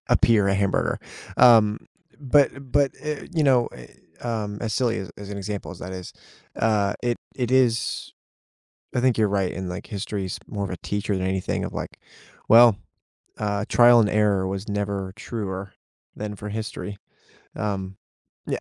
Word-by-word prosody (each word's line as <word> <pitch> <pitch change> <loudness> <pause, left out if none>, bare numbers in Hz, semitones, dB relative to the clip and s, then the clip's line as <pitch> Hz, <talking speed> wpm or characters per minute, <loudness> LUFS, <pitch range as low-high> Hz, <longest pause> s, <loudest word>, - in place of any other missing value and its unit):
appear 105 -4 +4
a 100 - +2
hamburger, 100 -1 +1 0.4
um, 110 -4 +6 0.4
but 140 +1 +4 0.2
but, 145 -2 +3
uh, 150 -1 -3
you 155 - +2
know, 125 -4 +4
eh, - - -12 0.3
um, 110 -4 -3
as 110 -2 -2
silly 115 +1 +1
as 95 -3 -6
as 100 0 -8
an 100 - -5
example 100 +1 -5
as - - -9
that 95 +1 -6
is, 90 -1 -7 0.4
uh, 105 -3 +2
it 120 -1 0 0.2
it 125 -2 -2
is, 120 -5 +1 0.8
I 125 - +2
think 125 -2 +2
you're 105 -2 +3
right. 95 -2 0
And 95 0 -4
like 90 +3 -6
history 100 -1 -3
is 90 - -5
more 100 -2 -4
of 95 - -4
a 90 - -3
teacher 100 0 -1
than 95 0 -1
anything 95 0 -1
of - - -5
like, - - -5 0.5
well, 115 -2 +8 0.6
uh, 105 -1 -1
trial 120 0 +7
and 105 - +3
error 105 -3 +2
was 95 +2 -4
never 100 -2 -2
truer 100 -3 -5 0.4
than 105 0 -5
for 105 +2 -7
history. 105 -1 -5 0.6
Um 95 -2 -3 0.5
n - - 0
105 Hz, 170 wpm, -24 LUFS, 100-115 Hz, 0.8 s, well